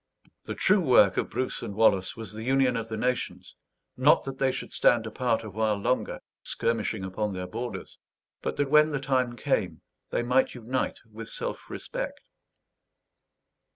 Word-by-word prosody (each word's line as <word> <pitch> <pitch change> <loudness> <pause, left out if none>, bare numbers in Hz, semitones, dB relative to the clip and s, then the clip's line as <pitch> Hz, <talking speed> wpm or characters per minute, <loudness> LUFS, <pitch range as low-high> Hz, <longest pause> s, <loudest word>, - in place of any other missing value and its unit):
The - - -4
true 205 +2 +4
work 125 - +5
of - - 0
Bruce 130 - -2
and 100 - -5
Wallace 100 -4 +3
was 110 -1 -7
the 110 - -7
union 130 +1 +2
of 115 -1 -3
the 110 - -3
nations; 125 +2 -2 0.4
not 135 +4 +5
that 135 -1 -6
they 135 -1 +3
should - - -6
stand 120 -2 +4
apart 115 0 0
a 110 - -6
while 110 +1 +1
longer, 100 +5 -1 0.2
skirmishing 110 -3 -1
upon 100 +2 -2
their 90 -1 -4
borders; 120 +7 -6 0.4
but - - -2
that, 145 -1 -1
when 150 0 +6
the 145 -2 -1
time 130 -3 0
came, 120 - -1 0.3
they - - 0
might 125 +3 +2
unite 125 +2 -2
with 110 0 -9
self - - -5
respect. - - -5
120 Hz, 165 wpm, -27 LUFS, 110-130 Hz, 0.4 s, when